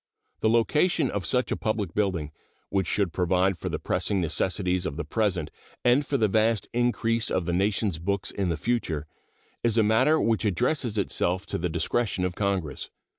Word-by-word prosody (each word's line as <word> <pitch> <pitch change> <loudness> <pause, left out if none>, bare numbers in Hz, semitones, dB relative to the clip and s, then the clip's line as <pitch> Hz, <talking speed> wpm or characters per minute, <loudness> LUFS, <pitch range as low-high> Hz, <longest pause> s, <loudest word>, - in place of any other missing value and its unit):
The 110 - +2
location 145 +6 +2
of 100 -4 -3
such 125 0 +1
a - - +2
public 110 -2 -2
building, 90 -8 -1 0.4
which 95 -3 0
should 100 -5 0
provide 90 +1 +2
for - - -5
the - - -2
pressing 100 - -1
necessities 90 +2 0
of 70 - -5
the 85 - -2
present 90 -1 -1 0.3
and 125 +4 +5
for 140 0 -1
the 110 -4 +3
vast 110 +2 +2
increase 115 -2 +1
of 90 - 0
the 85 - -1
nation's 100 -1 0
books 100 +3 -2
in 95 -3 -1
the 85 - -1
future, 85 -8 -1 0.6
is 115 -1 +1
a 110 - +5
matter 130 +9 +4
which 115 -1 +1
addresses 115 - 0
itself 95 -1 0
to - - -3
the 90 +1 -1
discretion 90 +4 0
of 90 - -2
Congress. 95 -6 -2
100 Hz, 180 wpm, -26 LUFS, 90-115 Hz, 0.6 s, and